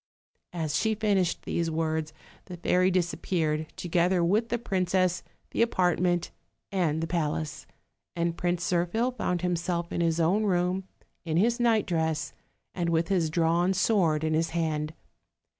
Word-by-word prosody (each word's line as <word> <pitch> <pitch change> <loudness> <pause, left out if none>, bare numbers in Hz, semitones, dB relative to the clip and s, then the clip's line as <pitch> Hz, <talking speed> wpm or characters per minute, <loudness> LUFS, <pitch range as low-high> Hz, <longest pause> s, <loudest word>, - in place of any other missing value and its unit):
As 160 -4 -2
she 220 0 +1
finished 200 -5 +1
these 170 -1 -1
words 160 -1 -1 0.3
the 180 -2 -8
fairy 180 +2 +2
disappeared, 170 -3 0
to 185 -1 -6
gether 175 +1 +2
with 210 +7 +2
the 240 - 0
princess, 185 -4 0 0.3
the - - 0
apartment 180 -5 +1 0.4
and 165 -5 0
the - - -2
palace, 155 -2 -2 0.5
and 170 0 0
Prince 175 0 -1
Zirphil 180 +8 +1
found 180 -6 -1
himself 175 -1 -1
in - - -1
his 165 0 +1
own 180 +6 +2
room 180 0 0 0.4
in 160 -1 -1
his 235 +6 +2
nightdress 175 -10 +1 0.4
and 175 -2 -1
with 165 0 +1
his 175 -5 +2
drawn 170 +3 +2
sAvord 180 -6 +2
in 155 0 0
his 165 +1 +1
hand. 155 -1 -1
175 Hz, 145 wpm, -28 LUFS, 165-185 Hz, 0.5 s, fairy